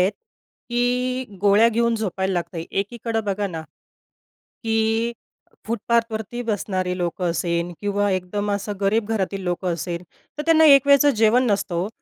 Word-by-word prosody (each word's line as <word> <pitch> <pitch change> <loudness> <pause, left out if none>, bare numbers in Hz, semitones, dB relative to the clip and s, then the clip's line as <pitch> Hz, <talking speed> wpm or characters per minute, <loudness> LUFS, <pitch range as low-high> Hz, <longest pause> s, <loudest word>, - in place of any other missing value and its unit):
आहेत, 185 +3 +3 0.6
की 250 +1 0 0.2
गोळ्या 205 +3 +5
घेऊन 235 0 +1
झोपायला 190 -3 -2
लागत. 175 0 -3
एकीकडे 225 +3 -2
बघा 200 0 -1
ना, 165 -4 -6 1.0
की 225 +1 +1 0.6
फुटपाथवरती 230 0 -1
बसणारे 185 -4 -2
लोकं 175 0 -2
असेल 170 +1 -1
किंवा 205 0 0
एकदम 195 +3 -2
असं 205 +1 -2
गरीब 205 +2 +1
घरातील 195 -2 -1
लोकं 180 0 -1
असेल 170 +1 -4 0.3
तर 300 - -3
त्यांना 320 -1 +5
एक 280 -2 +7
वेळचं 280 +1 +6
जेवण 225 +3 +4
नसतं 195 -3 -1
हो. 175 +4 -1
205 Hz, 140 wpm, -22 LUFS, 185-235 Hz, 1.0 s, एक